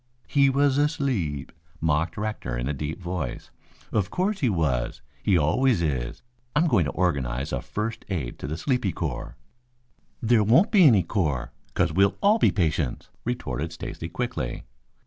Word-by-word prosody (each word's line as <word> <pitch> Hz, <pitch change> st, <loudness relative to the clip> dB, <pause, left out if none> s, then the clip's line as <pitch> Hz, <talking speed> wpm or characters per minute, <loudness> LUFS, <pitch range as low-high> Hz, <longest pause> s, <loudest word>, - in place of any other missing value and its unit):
"He 140 Hz, -1 st, +4 dB
was 140 Hz, +1 st, +3 dB
asleep," 130 Hz, -, 0 dB, 0.3 s
mocked 80 Hz, +2 st, 0 dB
Rector 105 Hz, -, -3 dB
in -, -, -2 dB
a 75 Hz, -, 0 dB
deep 75 Hz, +4 st, -4 dB
voice. 85 Hz, -8 st, -4 dB, 0.4 s
"Of 100 Hz, -3 st, +1 dB
course 195 Hz, +3 st, 0 dB
he 130 Hz, -, +2 dB
was. 70 Hz, -, -1 dB, 0.2 s
He 95 Hz, -3 st, +3 dB
always 90 Hz, -, +2 dB
is. 65 Hz, -6 st, -2 dB, 0.3 s
I'm 155 Hz, +3 st, +4 dB
going 115 Hz, -, +3 dB
to 75 Hz, -, -2 dB
organize 70 Hz, -6 st, -1 dB
a -, -, -1 dB
first 110 Hz, +2 st, -4 dB
aid 75 Hz, -11 st, -3 dB
to -, -, -5 dB
the 80 Hz, +3 st, -3 dB
sleepy 125 Hz, -, 0 dB
corps." 75 Hz, -7 st, -4 dB, 0.8 s
"There 115 Hz, -1 st, +3 dB
won't 130 Hz, -, +5 dB
be 195 Hz, -5 st, +7 dB
any 105 Hz, -9 st, +5 dB
corps, 80 Hz, -, -1 dB, 0.2 s
'cause 90 Hz, -3 st, +2 dB
we'll 100 Hz, +3 st, +3 dB
all 210 Hz, +3 st, +4 dB
be -, -, +5 dB
patients," 80 Hz, -, -1 dB
retorted 80 Hz, -, -3 dB
Stacy 80 Hz, 0 st, -6 dB
quickly. 95 Hz, -, -3 dB
90 Hz, 160 wpm, -26 LUFS, 75-125 Hz, 0.8 s, be